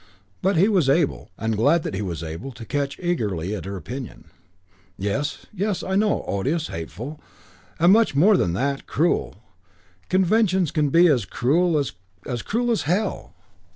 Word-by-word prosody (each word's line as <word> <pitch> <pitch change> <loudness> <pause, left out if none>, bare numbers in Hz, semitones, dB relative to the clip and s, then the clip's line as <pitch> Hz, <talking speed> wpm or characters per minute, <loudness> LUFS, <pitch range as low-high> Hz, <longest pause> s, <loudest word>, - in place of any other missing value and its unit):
But 190 -1 +2
he 190 +5 +5
was 185 -10 +2
able, 145 +1 +1
and 110 0 -1
glad 145 +10 +3
that - - -4
he 95 - -2
was 85 -5 -4
able 80 +11 -6
to 115 - -10
catch 140 +2 -2
eagerly 105 - -1
at 100 -4 -5
her 100 0 -5
opinion. 125 0 -7 0.7
"Yes, 105 +10 -2
yes, 205 0 -1
I 190 - -3
know, 210 +1 +2
odious, 145 - -1
hateful, 120 - -7 0.6
and 170 +3 +6
much 225 -9 +3
more 195 +9 +6
than 85 - +1
that, 140 +8 -2
cruel 165 - 0 0.7
conventions 190 -2 +2
can 150 -3 +1
be 170 +5 +5
as 135 - +3
cruel, 155 - +1
as 95 -2 -5
cruel 240 +2 -1
as 225 - +1
hell. 185 +8 -2
145 Hz, 160 wpm, -23 LUFS, -, 0.7 s, and